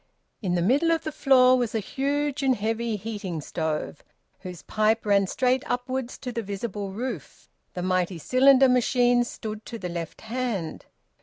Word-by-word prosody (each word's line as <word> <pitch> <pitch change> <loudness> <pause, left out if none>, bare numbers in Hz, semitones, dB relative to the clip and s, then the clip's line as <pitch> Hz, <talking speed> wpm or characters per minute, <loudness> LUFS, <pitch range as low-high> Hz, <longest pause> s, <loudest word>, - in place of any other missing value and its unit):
In 180 -4 0
the 175 - +1
middle 280 - +3
of 330 -1 +1
the 310 - -3
floor 255 -3 +5
was 240 -3 -1
a - - +2
huge 285 +5 -2
and 265 -2 +3
heavy 225 +1 -1
heating 205 -5 -5
stove, 155 0 -3 0.4
whose 180 -3 -9
pipe 215 +1 +1
ran 200 -2 +3
straight 255 +5 +1
upwards 250 0 -3
to 250 - -6
the 230 - -3
visible 205 0 -5
roof. 220 - -6 0.2
The 180 - -3
mighty 185 -1 0
cylinder 265 - +5
machine 245 -1 +3
stood 215 -2 -7
to 235 - -6
the 180 -5 -5
left 170 -2 -6
hand. 225 -7 -4
225 Hz, 165 wpm, -25 LUFS, 190-255 Hz, 0.4 s, floor